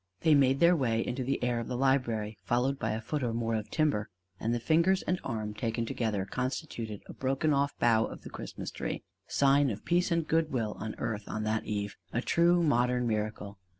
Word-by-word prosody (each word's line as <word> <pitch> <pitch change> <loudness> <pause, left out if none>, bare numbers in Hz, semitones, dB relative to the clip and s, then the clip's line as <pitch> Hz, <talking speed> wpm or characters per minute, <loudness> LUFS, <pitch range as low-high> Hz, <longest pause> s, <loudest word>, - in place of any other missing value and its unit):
They 160 - +5
made 135 -1 +4
their 170 +1 +6
way 115 -6 +1
into 130 +1 -2
the 135 0 -1
air 120 -1 +1
of 115 - -4
the 125 - -3
library, 120 -5 +1
followed 130 +3 0
by - - -1
a 110 - -3
foot 145 +6 -3
or 120 -3 -1
more 115 -1 -1
of 110 -1 -2
timber; 145 -9 +1 0.3
and 115 - -1
the 120 - +1
fingers 170 +8 +3
and 180 0 0
arm 110 -4 -3
taken 115 +2 -2
together 110 -4 -1
constituted 120 - -4
a - - -9
broken 135 +3 0
off 140 0 +1
bough 115 -2 +4
of - - -9
the - - -9
Christmas - - -6
Tree: - - -4 0.2
sign 140 0 +4
of 105 -2 -5
peace 175 +1 +2
and 170 -2 0
good 160 -1 +1
will 115 -5 -1
on 110 - -4
earth 105 -2 -3
on 110 0 -3
that 110 +1 -1
Eve: 100 -2 -3
a 115 - 0
true 170 +6 +3
modern 125 -4 +2
miracle! 105 -2 -3
120 Hz, 215 wpm, -30 LUFS, 110-140 Hz, 0.3 s, their